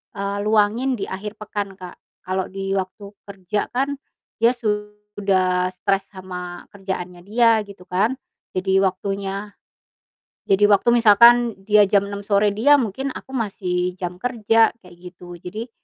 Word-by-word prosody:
eee, 200 0 -3
luangin 220 +5 +2
di 200 - -4
akhir 205 +2 -6
pekan 205 -2 -4
Kak, 180 -2 -11 0.3
kalo 185 0 -2
di 195 0 -5
waktu 190 +2 -5 0.2
kerja 200 +1 -3
kan 275 +2 -1 0.4
dia 235 +2 +4
sudah 210 -4 -1
stres 195 +1 -1
sama 180 -2 -8
kerjaannya 185 -3 -6
dia 225 +1 +3
gitu 195 -2 -13
kan, 210 +8 +1 0.4
jadi 190 +1 +2
waktunya 195 +2 -3 1.0
jadi 195 +1 +5
waktu 205 +3 +4
misalkan 235 +1 +6
dia 210 +1 +5
jam 200 0 +1
6.00 200 0 -6
sore 205 0 +3
dia, 225 +9 +4
mungkin 260 +5 -3
aku - - -10
masih 180 -5 -2
jam 180 -1 -6
kerja, 225 0 +2
kayak 180 -2 -16
gitu. 175 0 -11
Jadi 215 +8 -7
200 Hz, 140 wpm, -21 LUFS, 185-215 Hz, 1.0 s, misalkan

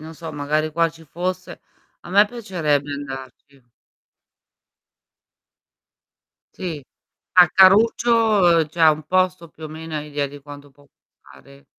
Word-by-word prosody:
non 160 +1 -11
so, 165 0 -9
magari 155 +1 -2
qua 165 +1 +1
ci 165 0 -16
fosse, 180 +3 -6 0.4
a - - -14
me 200 +3 +5
piacerebbe 170 - -2
andarci. 135 -1 -10 2.9
Sì. 165 -6 -6 0.5
Ah, 180 -2 +7
caruccio 215 +6 +4
uhm, 190 -8 +3
cioè, 165 +2 -4
un 155 0 0
posto, 185 0 0
più 155 0 -13
o - - -7
meno, 160 +1 -9
hai 150 0 -6
idea 145 -1 -2
di 145 +1 -11
quanto 145 0 -12
può 145 +1 -24
costare? 140 0 -21
160 Hz, 130 wpm, -21 LUFS, 145-185 Hz, 2.9 s, Ah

